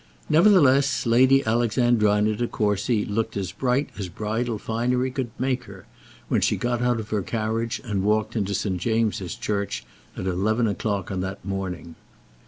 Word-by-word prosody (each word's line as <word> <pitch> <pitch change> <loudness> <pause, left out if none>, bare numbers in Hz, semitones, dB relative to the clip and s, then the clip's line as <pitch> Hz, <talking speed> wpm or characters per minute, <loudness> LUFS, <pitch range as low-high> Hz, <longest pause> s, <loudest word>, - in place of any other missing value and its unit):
Nevertheless 145 -7 +5
Lady 130 +4 +4
Alexandrina 110 -2 +2
De 120 +3 -1
Courcy 105 +1 0
looked 105 0 -2
as 95 -3 -3
bright 130 +6 0
as 95 -3 -4
bridal 110 +4 -2
finery 125 +4 -1
could 130 -2 -3
make 130 -1 -1
her, 100 -2 -12 0.4
when - - +1
she - - +2
got 120 0 -1
out 125 -1 +1
of 110 -1 -7
her 105 -2 +1
carriage 110 +3 -2
and 105 -6 -2
walked 110 +2 0
into 100 -2 -1
St. 95 -3 -1
James's 110 -5 0
church 100 -2 -3 0.3
at - - -4
eleven 105 +6 +1
o'clock 100 -2 -2
on 95 -1 -2
that 95 -1 -5
morning. 95 -3 -4
110 Hz, 160 wpm, -24 LUFS, 100-120 Hz, 0.4 s, Nevertheless